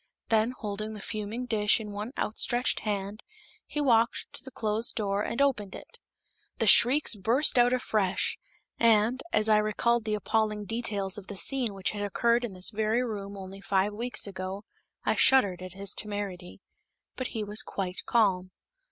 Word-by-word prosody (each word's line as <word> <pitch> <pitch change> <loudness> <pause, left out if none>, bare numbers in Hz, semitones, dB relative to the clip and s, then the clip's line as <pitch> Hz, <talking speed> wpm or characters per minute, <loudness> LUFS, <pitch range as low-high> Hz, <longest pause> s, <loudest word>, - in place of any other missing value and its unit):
Then, 225 +2 +2
holding 215 0 -5
the 210 - -8
fuming 215 +4 -5
dish 210 -3 +3
in 210 -2 -7
one 210 +4 -5
outstretched 240 +3 0
hand, 205 0 -4 0.5
he 295 - -4
walked 235 -5 +2
to - - -5
the 265 - -9
closed 220 -1 -1
door 200 -2 -1
and 230 - -3
opened 225 -8 0
it. - - -12 0.6
The - - 0
shrieks 270 +4 +6
burst 235 +6 +2
out 245 0 +5
afresh, 215 -6 0 0.4
and, 230 +2 +3
as 215 0 +2
I 215 -1 +5
recalled 215 +2 +1
the 215 -1 0
appalling 210 0 -1
details 205 -3 0
of 195 - -15
the 205 - -8
scene 245 -3 +1
which 190 -1 -1
had 205 - -5
occurred 235 +4 +1
in 230 -5 -4
this 185 +2 +1
very 220 +3 0
room 200 -4 -5
only 195 0 -9
five 195 +1 0
weeks 240 +4 -1
ago, 190 0 -6 0.4
I - - +2
shuddered 200 -10 +4
at 185 -1 -8
his 195 +1 -1
temerity. 200 -4 -4 0.5
But 255 - -3
he 215 - -1
was 210 +1 +1
quite 185 -2 -4
calm. 190 -5 +2
210 Hz, 170 wpm, -28 LUFS, 200-235 Hz, 0.6 s, shrieks